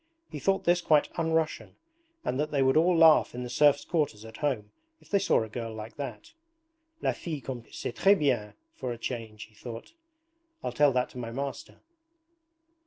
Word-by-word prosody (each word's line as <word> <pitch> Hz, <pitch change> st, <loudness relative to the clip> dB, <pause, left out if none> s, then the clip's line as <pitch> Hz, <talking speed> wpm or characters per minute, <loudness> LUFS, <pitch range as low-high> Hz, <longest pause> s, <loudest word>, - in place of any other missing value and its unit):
He -, -, -5 dB
thought 195 Hz, 0 st, +1 dB
this 175 Hz, +1 st, +3 dB
quite 155 Hz, -3 st, +3 dB
un 165 Hz, -1 st, 0 dB
Russian 160 Hz, -1 st, -1 dB, 0.5 s
and 130 Hz, -, -1 dB
that 150 Hz, +1 st, 0 dB
they 140 Hz, -3 st, +2 dB
would 130 Hz, 0 st, +3 dB
all 170 Hz, +2 st, +4 dB
laugh 160 Hz, -6 st, +6 dB
in 125 Hz, -, -4 dB
the 125 Hz, -, -6 dB
serfs' 145 Hz, +1 st, +4 dB
quarters 145 Hz, -, -1 dB
at 110 Hz, 0 st, -10 dB
home 120 Hz, -8 st, -2 dB, 0.3 s
if -, -, -23 dB
they 200 Hz, -, +4 dB
saw 115 Hz, -, +2 dB
a -, -, -6 dB
girl 115 Hz, +1 st, -5 dB
like 110 Hz, +1 st, -8 dB
that. 235 Hz, -, -7 dB, 0.7 s
'La -, -, +3 dB
fille 160 Hz, -4 st, -5 dB
comme 125 Hz, -3 st, -6 dB
c'est -, -, -4 dB
tres 200 Hz, +1 st, +5 dB
bien, 125 Hz, -, 0 dB, 0.2 s
for 125 Hz, -, -4 dB
a 120 Hz, -, -5 dB
change,' 115 Hz, -3 st, -5 dB
he 110 Hz, -, -17 dB
thought. 115 Hz, -, -9 dB, 0.7 s
'I'll -, -, -2 dB
tell 145 Hz, -1 st, +4 dB
that 125 Hz, -1 st, 0 dB
to 125 Hz, -, -8 dB
my 115 Hz, -1 st, -4 dB
master.' 135 Hz, +3 st, -6 dB
135 Hz, 195 wpm, -28 LUFS, 115-155 Hz, 0.7 s, laugh